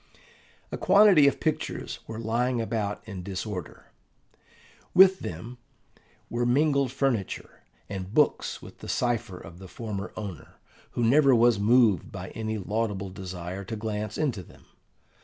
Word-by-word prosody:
A - - -4
quantity 195 -8 +6
of 140 - +1
pictures 155 -2 -2
were 110 - -6
lying 120 +2 0
about 110 -2 -3
in 100 -4 -6
disorder: 95 -2 -6 1.0
with 190 +1 +7
them 115 +9 -7 0.7
were 120 +1 -2
mingled 140 +1 +2
furniture, 130 -7 -2 0.3
and 95 -1 -6
books 150 +5 +1
with - - -12
the - - -9
cipher 115 -6 -1
of 85 +1 -12
the 95 - -10
former 105 0 -6
owner, 100 -7 -7 0.4
who 120 - -1
never 135 +3 +5
was 115 -2 +4
moved 110 -4 +3
by - - -7
any 110 -1 -4
laudable 105 -1 -2
desire 90 0 -6
to 110 - -5
glance 105 -1 -4
into 135 -11 -1
them. 90 - -17
110 Hz, 140 wpm, -27 LUFS, 95-125 Hz, 1.0 s, with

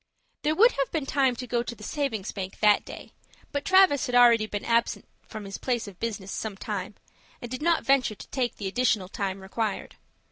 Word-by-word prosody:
There 305 +1 +1
would 460 +7 +6
have 275 - -1
been 310 -4 -2
time 270 -2 +2
to 250 - -6
go 240 0 0
to 240 0 -6
the 210 - -13
savings 225 -6 -2
bank 190 -1 -6
that 210 -1 +4
day, - - -10 0.4
but 285 0 -2
Travis 375 -7 +5
had 245 - -2
already 235 -3 +6
been 205 -1 -5
absent 235 0 +1 0.2
from 215 -2 -8
his 195 - -7
place 240 -4 -1
of 190 -3 -11
business 205 -4 -4
some 215 -3 -4
time, 205 0 -5 0.4
and 240 - -8
did 255 - -4
not 335 +1 +2
venture 270 -6 +3
to - - -12
take 250 -3 -1
the 205 - -7
additional 215 -3 +1
time 195 -1 -3
required. 205 +2 -4
235 Hz, 210 wpm, -27 LUFS, 205-270 Hz, 0.4 s, would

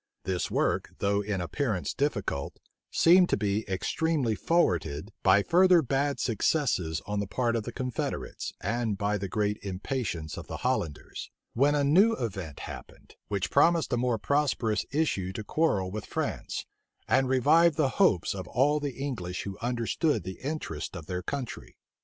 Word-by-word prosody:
This 95 -2 -1
work, - - 0
though 100 +1 +1
in 100 -2 -2
appearance 105 - -2
difficult, 145 +1 -2 0.3
seemed 180 +2 +5
to - - +2
be 105 +1 -1
extremely 130 - 0
forwarded, 95 - 0
by 95 +1 +5
further 180 - +5
bad 140 +2 0
successes 105 - 0
on 105 0 -2
the 100 - -2
part 120 +4 0
of 110 -2 -2
the 120 - -4
confederates, 125 0 -4
and 110 0 -1
by 105 +1 0
the 100 - -3
great 105 +1 0
impatience 95 - -3
of - - -7
the - - -5
Hollanders; 75 -4 -2 0.2
when 140 +5 +3
a 145 - +2
new 190 +11 +5
event 95 - -4
happened, - - -10
which 100 -2 -2
promised 165 +2 +3
a - - +4
more 120 -1 +1
prosperous 130 -3 0
issue 140 - 0
to 110 - -4
the - - -25
quarrel 100 - +1
with 105 +1 -5
France, - - -3 0.4
and 130 -1 +3
revived 150 +5 +4
the 150 -4 +3
hopes 105 - +3
of 95 -2 -6
all 145 +5 +2
the 145 -2 -3
English 115 -11 -4
who 100 -1 -5
understood 120 +6 0
the 95 - -7
interests 95 - -4
of 80 - -8
their 90 +1 -3
country. 130 +5 -6
115 Hz, 165 wpm, -28 LUFS, 95-145 Hz, 0.4 s, seemed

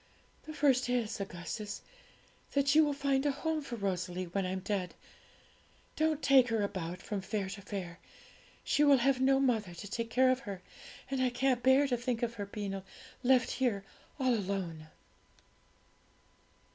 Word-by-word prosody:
'The 310 - -6
first 255 -4 +3
is, 235 -4 -1
Augustus, 195 +3 -5 0.7
that 280 0 +3
you 315 +1 +7
will 295 - +1
find 275 -1 +1
a 290 - +2
home 315 +2 -2
for 265 -4 -6
Rosalie 185 -3 -2
when 185 +2 -2
I'm 185 +1 -3
dead. 190 -2 -2 1.0
Don't 315 -1 +1
take 265 -3 +6
her 225 -3 0
about 180 -3 -4
from 205 -2 -3
fair 195 0 -3
to 200 - -7
fair; 185 -3 -6 0.6
she 295 - +2
will 285 -2 +7
have 260 +1 +2
no 270 +1 +4
mother 220 -9 +1
to 205 - -8
take 230 +3 -3
care 255 +2 +4
of 255 - +1
her, 200 -7 -7 0.5
and 265 -1 0
I 255 - +3
can't 250 0 +1
bear 265 +3 +5
to 250 -2 0
think 240 -1 -2
of 235 -1 0
her 200 - -4
being 200 -1 -4 0.4
left 255 -1 +3
here 225 -7 0 0.3
all 260 -2 +3
alone.' 185 -7 -3
235 Hz, 165 wpm, -32 LUFS, 195-265 Hz, 1.0 s, you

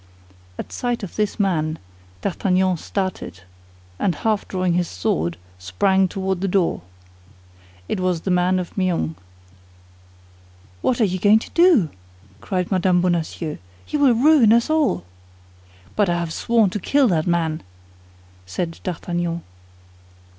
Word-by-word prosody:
At - - -7
sight 245 -3 -2
of 195 - -7
this 210 +1 -1
man, 160 -5 0 0.4
D'Artagnan 185 - +1
started, 185 - -4 0.6
and 180 -5 +1
half 215 +4 -1
drawing 185 -2 0
his 175 0 +1
sword, 85 - -1 0.2
sprang 190 - +2
toward 190 0 -2
the 195 - 0
door. 180 - +1 1.1
It - - -2
was 180 -3 0
the 190 - -2
man 180 +1 +2
of 180 -2 -5
Meung. 175 - 0 1.7
"What 245 - +1
are - - +5
you 185 -1 -2
going 205 +3 +6
to 220 - -6
do?" 335 - +4 0.5
cried 180 -1 -2
Mme. 185 -1 +3
Bonacieux; 170 -3 -1 0.3
"you 300 - -1
will 270 -4 +5
ruin 265 -3 +5
us 235 +6 +2
all!" 295 - +1 0.9
"But 205 -3 +2
I 175 - +1
have 170 -2 -3
sworn 225 -5 +2
to 210 - -3
kill 280 +7 +3
that 160 -3 +1
man!" 165 -2 0 0.9
said 165 - -4
D'Artagnan. 175 -1 -3
185 Hz, 135 wpm, -21 LUFS, 170-210 Hz, 1.7 s, going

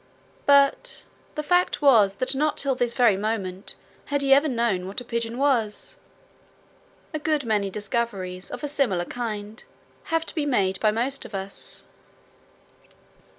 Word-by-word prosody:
But 280 - +4 0.3
the 300 - -2
fact 355 +3 +2
was 225 -9 +5
that 255 - -1
not 300 +3 0
till 275 -1 +1
this 245 -2 -1
very 235 -5 +5
moment 200 -2 -3 0.3
had 285 -1 0
he 270 0 +6
ever 285 +3 +5
known 230 -8 0
what 195 - -4
a 245 - -10
pigeon 235 0 -2
was. 260 - 0 1.2
A 310 - -2
good 300 -2 0
many 210 -3 +1
discoveries 195 -3 -3
of - - -7
a - - 0
similar 240 -12 0
kind 215 -2 -5 0.4
have 325 0 0
to - - -6
be 300 -3 -1
made 195 -8 +1
by 215 - +3
most 245 +6 -1
of 210 - -8
us. 195 0 -6
235 Hz, 150 wpm, -25 LUFS, 205-280 Hz, 1.2 s, he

